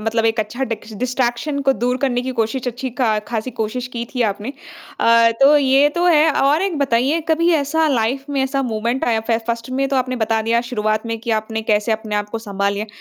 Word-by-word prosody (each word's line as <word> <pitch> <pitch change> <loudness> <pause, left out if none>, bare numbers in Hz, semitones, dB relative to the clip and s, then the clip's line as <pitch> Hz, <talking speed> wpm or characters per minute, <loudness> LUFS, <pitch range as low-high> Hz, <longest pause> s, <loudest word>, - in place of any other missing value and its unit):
मतलब 225 +1 0
एक 225 0 +1
अच्छा 240 +5 -3
डिक्स 225 -1 -6
डिस्ट्रैक्शन 255 +3 -1
को 270 0 +3
दूर 250 -1 -1
करने 250 -3 0
की 260 - -3
कोशिश 230 +3 -1
अच्छी 250 +2 -5
का 220 -4 +2
ख़ासी 230 +1 -3
कोशिश 240 +2 -3
की 235 -1 -3
थी 250 - +1
आपने। 205 +6 -5 0.5
अ, 230 0 +5
तो 290 +2 +7
ये 275 0 +4
तो 345 0 0
है 320 -2 +5
और 290 +5 +3
एक 380 -6 -1
बताइए 275 +3 +1
कभी 335 +2 +3
ऐसा 315 +2 +1
लाइफ़ 260 +1 0
में 275 -1 +1
ऐसा 275 +1 -1
मोमेंट 235 +1 -1
आया 225 -2 +1
फ - - 0 0.2
फ़र्स्ट 235 +1 -3
में 270 +1 0
तो 270 - 0
आपने 255 0 -1
बता 225 -1 0
दिया 230 +1 +2
शुरुआत 215 -1 -1
में 230 0 -3
कि 235 +1 -4
आपने 220 +1 -5
कैसे 215 +1 +1
अपने 215 -1 -3
आप 205 0 -2
को 225 - -4
सँभाल 200 -2 -2
लिए। 210 +2 -4
240 Hz, 225 wpm, -19 LUFS, 220-270 Hz, 0.5 s, तो